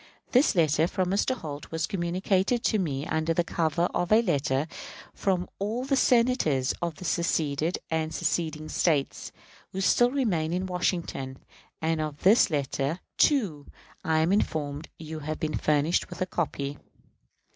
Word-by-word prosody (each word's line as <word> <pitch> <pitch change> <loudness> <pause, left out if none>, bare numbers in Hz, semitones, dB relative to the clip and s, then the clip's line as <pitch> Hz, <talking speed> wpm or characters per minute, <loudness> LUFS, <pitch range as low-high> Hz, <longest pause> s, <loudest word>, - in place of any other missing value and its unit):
This 255 -1 +4
letter 160 -1 +3
from 185 -1 -1
Mr. 205 +6 +1
Holt 150 - -7
was 160 -1 -1
communicated 190 +5 0
to 215 - +2
me 145 -6 -2
under 160 +1 0
the 175 - +2
cover 165 0 0
of 175 +2 -1
a 220 +2 +6
letter 140 - +1 0.5
from 185 -2 0
all 220 +6 -2
the 275 0 +1
Senators 235 - +3
of 170 -2 -2
the 185 - -9
seceded 160 -1 0
and 160 -1 0
seceding 155 -2 -1
States, 150 -4 0 0.4
who 190 - -3
still 240 +5 +4
remained 180 - 0
in 185 +1 -1
Washington; 170 -7 -2 0.5
and 160 0 +1
of 150 -2 -5
this 210 +4 +6
letter, 145 +1 -1 0.2
too, 195 - +2 0.4
I 160 0 +2
am 165 +3 +2
informed 155 -6 -1
you 160 0 -7
have 155 +1 -4
been 155 -1 -2
furnished 150 +2 +1
with - - -9
a 185 - +1
copy. 145 -6 -3
165 Hz, 155 wpm, -27 LUFS, 155-190 Hz, 0.5 s, a